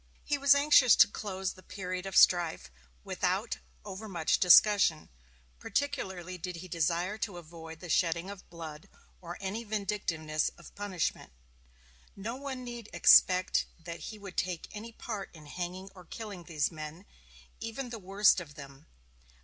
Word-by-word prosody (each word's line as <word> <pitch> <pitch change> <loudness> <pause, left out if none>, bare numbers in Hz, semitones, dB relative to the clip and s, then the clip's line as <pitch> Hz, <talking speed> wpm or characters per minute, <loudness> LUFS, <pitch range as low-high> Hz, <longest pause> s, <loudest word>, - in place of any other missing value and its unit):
He 295 - 0
was 280 0 +6
anxious 280 -4 +6
to - - +7
close 190 -2 -4
the 185 - -16
period 185 -1 -5
of 195 - -1
strife 170 - +4 0.3
without - - -1 0.3
over 210 +3 -7
much 170 -4 +1
discussion. 180 -3 +6 0.5
Particularly 190 - -3
did 180 +1 -5
he 175 +2 -8
desire 175 +4 -1
to 205 -4 -3
avoid 165 -1 -10
the 180 - -8
shedding 170 +1 +1
of 200 -2 -10
blood, 160 -3 -9 0.3
or 175 -1 -7
any 200 +4 -4
vindictiveness 195 -8 -1
of 170 - -14
punishment. 190 - -3 0.8
"No 220 +5 -5
one 265 -1 -6
need 240 -3 -8
expect 185 0 +5
that 170 0 -8
he 215 - -7
would 200 -3 -10
take 180 -3 -2
any 220 +2 -8
part 215 -3 -6
in 155 -2 -13
hanging 180 +5 -6
or 180 -2 -14
killing 200 -2 -8
these 155 -2 0
men, 155 +3 -8 0.5
even 235 +2 -5
the 230 - -5
worst 195 +1 +4
of 145 -4 -11
them." 140 -1 -12
185 Hz, 150 wpm, -31 LUFS, 170-210 Hz, 0.8 s, to